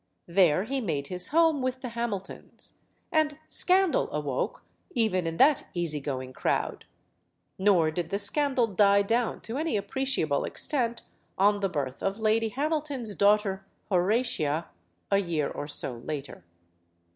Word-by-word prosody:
There 175 -1 +3
he 265 +4 -2
made 150 - -3
his 180 -1 0
home 320 -2 +3
with 255 0 -2
the 250 - -4
Hamiltons. 230 -5 -6 0.3
And 310 -2 +1
scandal 375 -2 +2
awoke, 145 -4 -3 0.3
even 190 -7 +1
in 165 0 -3
that 285 +1 +4
easy 165 -4 -1
going 130 -2 -5
crowd. - - -1 0.7
Nor 185 -5 +4
did 170 0 -3
the 200 - -1
scandal 260 +4 +2
die 200 -1 +4
down 230 +3 0
to 230 +3 -4
any 315 -7 0
appreciable 235 - 0
extent 240 -6 0 0.3
on 205 +1 +4
the 195 -1 0
birth 140 -5 -4
of 195 +1 -1
Lady 220 0 +2
Hamilton's 285 -3 -2
daughter, 200 -1 +2 0.3
Horatia, 180 - +1 0.4
a 200 - +4
year 165 -6 -1
or 145 - -5
so 145 -3 0
later. 140 - -6
200 Hz, 140 wpm, -28 LUFS, 165-255 Hz, 0.7 s, that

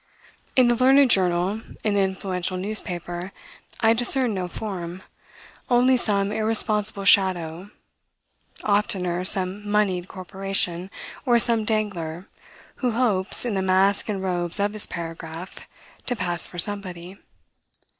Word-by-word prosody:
In 255 -2 +5
the 240 - +4
learned 260 +2 +5
journal, 185 +3 +2 0.2
in 215 - +1
the 200 - +2
influential 190 -1 -2
newspaper, 180 -2 -4 0.5
I 225 0 +5
discern 245 0 +4
no 185 -2 -3
form; 185 -2 -6 0.7
only 250 +1 +4
some 200 -4 0
irresponsible 215 -2 0
shadow; 185 -2 +3 0.9
oftener 185 -4 0
some 190 +2 0
monied 195 -4 +1
corporation, 190 -1 -2 0.3
or 240 -3 +3
some 230 -2 +3
dangler, 195 -5 -3 0.5
who 250 -3 -1
hopes, 220 -4 0
in 235 - -1
the 190 - 0
mask 190 +3 +2
and 195 -2 -3
robes 175 -1 -2
of 205 +1 0
his 215 - 0
paragraph, 165 +1 -8 0.4
to 245 - 0
pass 175 -4 +1
for 175 - -11
somebody. 185 -1 -3
195 Hz, 125 wpm, -23 LUFS, 180-215 Hz, 0.9 s, In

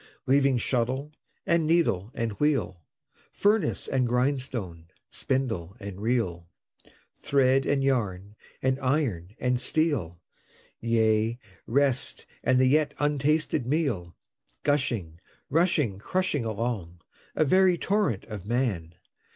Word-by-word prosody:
Leaving 135 -1 +3
shuttle, 130 +4 -1 0.3
and 170 -4 +2
needle, 155 - +2
and 115 -3 -1
wheel, 135 - 0 0.5
Furnace, 210 +1 +1
and 130 -2 +1
grindstone, 125 - -2 0.2
spindle, 115 -8 -2
and 100 -2 -7
reel, 95 -8 -1 0.7
Thread, 135 -1 +2
and 140 -1 +1
yarn, 105 -7 -1 0.3
and 130 0 +1
iron, 125 - -1
and 125 0 0
steel 125 - 0 0.6
Yea, 110 0 +2 0.3
rest 135 +1 +1 0.2
and 130 - +3
the 130 - +5
yet 150 +3 +2
untasted 150 -2 +1
meal 125 - -1 0.5
Gushing, 115 - -1 0.3
rushing, 150 - +2
crushing 175 - -1
along, 105 -6 -3 0.3
A 155 - +3
very 185 +3 +4
torrent 195 - 0
of 105 -5 -7
Man! 100 -8 -1
125 Hz, 110 wpm, -27 LUFS, 105-145 Hz, 0.7 s, the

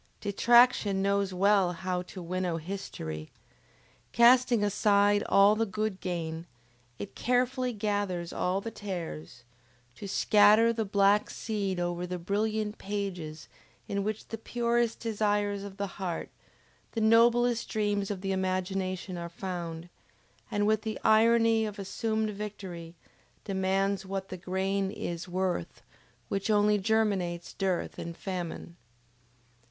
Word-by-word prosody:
Detraction 215 -1 +4
knows 200 -1 +1
well 190 -1 +3
how 180 0 -2
to 180 0 -9
winnow 180 -1 -2
history! 80 - -6 0.8
Casting 240 -1 +5
aside 205 0 +3
all 200 +2 +6
the 225 - +1
good 205 0 -3
grain, 165 -2 -4 0.5
it 200 - -7
carefully 250 +1 0
gathers 205 -5 -2
all 185 +2 0
the 230 - -5
tares, 165 - -6 0.5
to 200 - -8
scatter 210 +3 +5
the 225 -1 -2
black 200 +1 +3
seed 200 -4 -3
over 175 0 -2
the 180 0 -3
brilliant 210 +4 -2
pages 180 -7 -5 0.4
in 200 0 -1
which 215 +1 -4
the 225 - -5
purest 235 0 0
desires 205 -2 0
of 200 -1 -9
the 200 - -1 0.2
heart, 175 -3 -3 0.6
the 225 - -1
noblest 235 +1 +4
dreams 205 -2 0
of 200 -3 -4
the 195 0 -2
imagination 185 -1 -2
are 170 0 -5
found; 170 -2 -5 0.6
and 205 -2 0
with 215 0 +2
the 220 0 -4
irony 225 0 +4
of 210 -1 -4
assumed 220 +2 -2
victory, 190 -5 -7 0.5
demands 195 0 0
what 195 0 -5
the 185 - -6
grain 190 +2 -1
is 175 -4 -5
worth 180 - -2 0.4
which 195 - -2
only 210 0 +4
germinates 195 -5 0
dearth 190 -3 -2
and 170 0 -6
famine? 175 -3 -5
200 Hz, 125 wpm, -29 LUFS, 185-215 Hz, 0.8 s, all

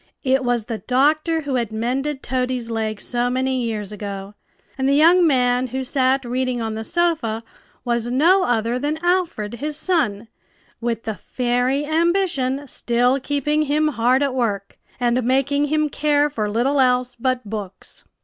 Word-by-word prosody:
It 265 -1 +2
was 245 -3 0
the 225 -2 -4
doctor 310 +5 +2
who 285 -2 -4
had 235 -3 -2
mended 265 +6 -2
Toady's 250 -2 -2
leg 220 -2 -2
so 245 0 -1
many 260 0 0
years 215 -4 -3
ago, 200 -1 -6 0.4
and 265 0 0
the 280 - +3
young 340 +4 +6
man 250 -2 +2
who 260 +2 -3
sat 265 0 +1
reading 250 0 -1
on 225 -1 -3
the 220 0 -4
sofa 310 -8 0 0.5
was 235 -1 0
no 345 +9 +4
other 235 +1 0
than 295 +3 -1
Alfred, 350 - 0
his 300 +1 -3
son, 235 - 0 0.5
with 230 -1 -2
the 220 - -3
fairy 250 - -1
Ambition 315 -4 0
still 245 +2 +1
keeping 290 +3 0
him 305 +2 +2
hard 255 +1 +2
at 275 -2 0
work, 205 -6 -2 0.2
and 245 0 +1
making 275 +3 +1
him 305 +1 +1
care 295 0 +1
for 215 -6 -2
little 250 +7 +1
else 250 -1 +2
but 255 -1 -1
books. 200 -3 -7
255 Hz, 160 wpm, -21 LUFS, 235-290 Hz, 0.5 s, young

